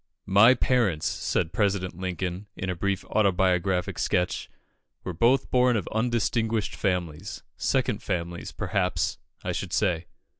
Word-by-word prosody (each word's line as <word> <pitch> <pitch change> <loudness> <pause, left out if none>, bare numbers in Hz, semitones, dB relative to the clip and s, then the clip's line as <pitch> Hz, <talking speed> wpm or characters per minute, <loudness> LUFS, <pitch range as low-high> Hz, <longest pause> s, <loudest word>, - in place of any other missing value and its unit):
"My 105 +6 +6
parents," 105 -14 +1
said 85 0 -1
President 100 -4 0
Lincoln, 90 +1 -4
in 95 0 -3
a - - -3
brief 100 +2 -1
autobiographic 95 -2 +1
sketch, 90 +1 0 0.5
"were 90 - -4
both 120 +10 +2
born 125 -2 +4
of 100 - -3
undistinguished 115 -1 0
families 90 0 -2
second - - 0
families, 85 -1 -3
perhaps, - - -1 0.2
I - - -1
should - - -4
say." 85 -1 +1
95 Hz, 125 wpm, -26 LUFS, 90-110 Hz, 0.5 s, My